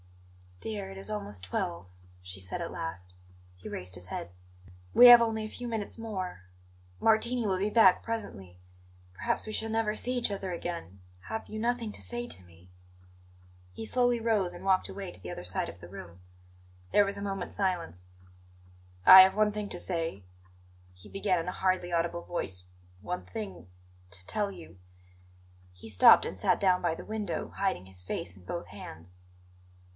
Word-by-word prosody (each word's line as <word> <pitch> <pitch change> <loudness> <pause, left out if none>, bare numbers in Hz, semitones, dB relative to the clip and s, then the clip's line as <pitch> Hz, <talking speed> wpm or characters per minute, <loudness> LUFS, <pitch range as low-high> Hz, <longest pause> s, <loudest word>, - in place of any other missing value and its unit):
"Dear, 100 -3 -4
it 95 - -9
is 95 +1 -5
almost 100 -2 -5
twelve," 90 -1 -3 0.3
she 90 +1 -10
said 90 -1 -5
at - - -4
last. 90 +2 -6 0.4
He 90 - -10
raised 90 0 -7
his 90 0 -10
head. 85 - -5 0.6
"We 245 - +10
have 240 -1 +11
only 220 -1 0
a 215 - -5
few 245 +2 -6
minutes 225 -2 -3
more; 190 - -5 0.6
Martini 230 +2 +2
will 190 -2 +1
be 200 +2 +1
back 210 -6 +6
presently. 100 - -6 0.6
Perhaps - - -1
we 215 - -5
shall 225 +1 -1
never 220 -1 0
see 250 +3 0
each 240 - 0
other 195 -2 -4
again. 170 - -5 0.3
Have 220 0 -4
you 215 - -6
nothing 235 -1 -1
to - - -11
say 240 0 -4
to 95 - -8
me?" 85 +1 -19 1.0
He 225 - -6
slowly 245 0 +2
rose 215 -6 +1
and - - -10
walked 190 -1 +3
away 195 -2 -6
to - - -15
the 90 -1 -7
other - - -6
side 90 +1 -2
of 85 - -11
the 85 - -9
room. 90 -2 -10 0.7
There 205 - +5
was 200 0 -2
a - - -6
moment's 195 -2 -4
silence. 175 - -2 1.0
"I 190 0 +13
have 190 0 +5
one 210 0 +3
thing 210 -1 -4
to - - -5
say," 165 - -3 0.7
he 90 +3 -16
began 195 -2 0
in 165 - -4
a - - -1
hardly 185 -2 0
audible 170 0 0
voice; 90 - -4 0.4
"one 90 -3 -4
thing 90 -2 -7 0.4
to 95 -2 -10
tell 205 - -1
you 85 - -12 0.5
" 90 0 -28
He 110 - -8
stopped 95 -4 +7
and - - -5
sat - - +2
down 185 -2 +3
by 170 -2 +2
the - - -9
window, 215 -1 -3
hiding 190 - 0
his 95 -1 -7
face 90 -1 -5
in 90 -2 -17
both - - -5
hands. 85 +3 -10
175 Hz, 180 wpm, -30 LUFS, -, 1.0 s, I